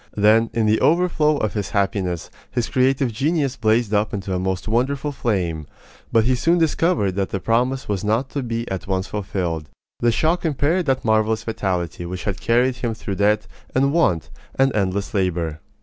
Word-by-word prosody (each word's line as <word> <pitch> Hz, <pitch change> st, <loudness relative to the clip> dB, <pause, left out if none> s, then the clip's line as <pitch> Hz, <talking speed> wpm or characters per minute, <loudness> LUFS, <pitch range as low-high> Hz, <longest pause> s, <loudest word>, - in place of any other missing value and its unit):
Then, 110 Hz, +2 st, +4 dB
in 115 Hz, -1 st, 0 dB
the 110 Hz, +1 st, +2 dB
overflow 160 Hz, -3 st, +3 dB
of 110 Hz, -6 st, -1 dB
his 105 Hz, -2 st, -3 dB
happiness, 95 Hz, -4 st, -1 dB, 0.2 s
his 120 Hz, -2 st, -2 dB
creative 130 Hz, 0 st, +2 dB
genius 140 Hz, +2 st, 0 dB
blazed 110 Hz, 0 st, +1 dB
up 105 Hz, 0 st, +1 dB
into 95 Hz, -1 st, -4 dB
a 90 Hz, -, 0 dB
most 95 Hz, +1 st, -2 dB
wonderful 135 Hz, +6 st, 0 dB
flame; 90 Hz, -, -2 dB, 0.4 s
but 115 Hz, -, +4 dB
he 130 Hz, +3 st, +2 dB
soon 165 Hz, +7 st, +2 dB
discovered 165 Hz, -, +2 dB
that 95 Hz, +1 st, -2 dB
the 95 Hz, -, -2 dB
promise 125 Hz, +6 st, 0 dB
was 100 Hz, -3 st, -2 dB
not 115 Hz, +5 st, 0 dB
to 140 Hz, -, -2 dB
be 115 Hz, -1 st, -3 dB
at 95 Hz, 0 st, -4 dB
once 95 Hz, -1 st, 0 dB
fulfilled. 90 Hz, -6 st, -3 dB, 0.3 s
The 120 Hz, -, +3 dB
shock 160 Hz, +9 st, +1 dB
impaired 160 Hz, +3 st, +1 dB
that 130 Hz, -2 st, 0 dB
marvelous 110 Hz, 0 st, +2 dB
vitality 90 Hz, -6 st, -2 dB
which 90 Hz, +1 st, -5 dB
had 100 Hz, -2 st, -3 dB
carried 125 Hz, +2 st, +2 dB
him 120 Hz, -2 st, -2 dB
through 100 Hz, -3 st, -5 dB
debt, 105 Hz, +1 st, +2 dB, 0.3 s
and 140 Hz, +2 st, +3 dB
want, 90 Hz, -, +1 dB, 0.2 s
and 135 Hz, -2 st, +2 dB
endless 100 Hz, 0 st, -1 dB
labor. 85 Hz, -5 st, -1 dB
110 Hz, 180 wpm, -21 LUFS, 95-130 Hz, 0.4 s, Then